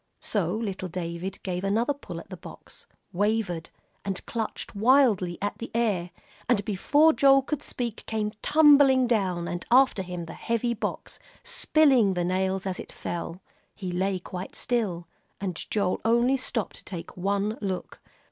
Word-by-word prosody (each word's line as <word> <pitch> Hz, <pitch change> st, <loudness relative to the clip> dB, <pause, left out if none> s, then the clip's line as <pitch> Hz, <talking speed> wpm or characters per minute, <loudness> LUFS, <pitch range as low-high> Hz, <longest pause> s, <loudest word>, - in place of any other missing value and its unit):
So -, -, 0 dB
little 195 Hz, -4 st, -3 dB
David 175 Hz, +2 st, -4 dB
gave 180 Hz, -1 st, -3 dB
another 225 Hz, +8 st, +1 dB
pull 285 Hz, -, -8 dB
at -, -, -13 dB
the -, -, -5 dB
box, -, -, -12 dB, 0.3 s
wavered, 200 Hz, -4 st, 0 dB, 0.3 s
and 195 Hz, -2 st, -4 dB
clutched 225 Hz, -2 st, -4 dB
wildly 215 Hz, -6 st, +3 dB
at 205 Hz, -, -2 dB
the 235 Hz, -, -6 dB
air, 205 Hz, -7 st, +1 dB, 0.4 s
and 205 Hz, -5 st, +2 dB
before 290 Hz, +10 st, +4 dB
Joel 275 Hz, -2 st, +5 dB
could 295 Hz, +1 st, -3 dB
speak, 235 Hz, -3 st, -4 dB
came 215 Hz, -1 st, -1 dB
tumbling 285 Hz, -4 st, +6 dB
down, 190 Hz, -7 st, 0 dB
and 175 Hz, -, -4 dB
after 260 Hz, -4 st, +5 dB
him, 180 Hz, -2 st, -5 dB
the 160 Hz, -, -8 dB
heavy 235 Hz, +1 st, -1 dB
box, 230 Hz, -, -5 dB, 0.2 s
spilling 285 Hz, -, +3 dB
the 175 Hz, -1 st, 0 dB
nails 190 Hz, +1 st, 0 dB
as 190 Hz, -1 st, -3 dB
it -, -, -8 dB
fell. 175 Hz, +1 st, -5 dB, 0.3 s
He 185 Hz, -3 st, -5 dB
lay 190 Hz, +2 st, 0 dB
quite 180 Hz, +1 st, -7 dB
still, 195 Hz, -9 st, -1 dB, 0.3 s
and 190 Hz, -3 st, -3 dB
Joel 200 Hz, -4 st, 0 dB
only 235 Hz, +4 st, +3 dB
stopped 250 Hz, -4 st, -3 dB
to -, -, -12 dB
take 175 Hz, -4 st, -7 dB
one 200 Hz, +3 st, -1 dB
look. 190 Hz, -3 st, -4 dB
205 Hz, 155 wpm, -27 LUFS, 185-240 Hz, 0.4 s, tumbling